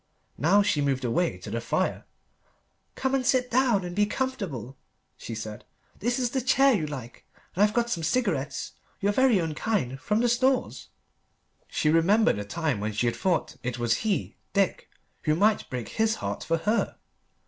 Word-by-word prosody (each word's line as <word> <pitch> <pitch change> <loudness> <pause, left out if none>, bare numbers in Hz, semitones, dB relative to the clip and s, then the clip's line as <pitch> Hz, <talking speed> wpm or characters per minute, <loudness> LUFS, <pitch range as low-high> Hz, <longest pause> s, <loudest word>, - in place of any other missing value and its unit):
Now 195 +7 +4
she 160 -7 +1
moved 135 -2 0
away 170 +9 0
to - - -9
the - - -2
fire. - - -1 0.9
"Come 265 0 -1
and 270 -1 +2
sit 255 -1 +2
down 240 -6 +3
and 175 0 -6
be 205 0 +3
comfortable," 200 - -3 0.4
she 115 - -7
said. 110 -1 -6 0.4
"This 240 +3 0
is 250 -2 0
the 265 - 0
chair 265 +2 +4
you 165 -9 0
like. 130 -5 -8 0.3
And 190 - -1
I've 210 +1 +4
got 235 0 +1
some 170 - -1
cigarettes, 165 - -1 0.3
your 205 0 +2
very 260 -4 +4
own 165 -2 -2
kind, 150 - -1
from 210 - 0
the 245 - +3
Stores." 255 +2 +1 0.8
She 150 - +1
remembered 175 - +4
a - - -3
time 150 +2 -2
when 105 +1 -2
she 110 +4 0
had 115 - +1
thought 180 -4 0
that - - -19
it 125 0 -3
was 120 -1 +1
he, 215 -4 -2 0.2
Dick, 195 -2 0 0.3
who 155 -1 +1
might 210 +5 +2
break 125 -4 -4
his 220 0 +1
heart - - -4
for 165 - +1
her. 210 +8 0
195 Hz, 185 wpm, -27 LUFS, -, 0.9 s, Now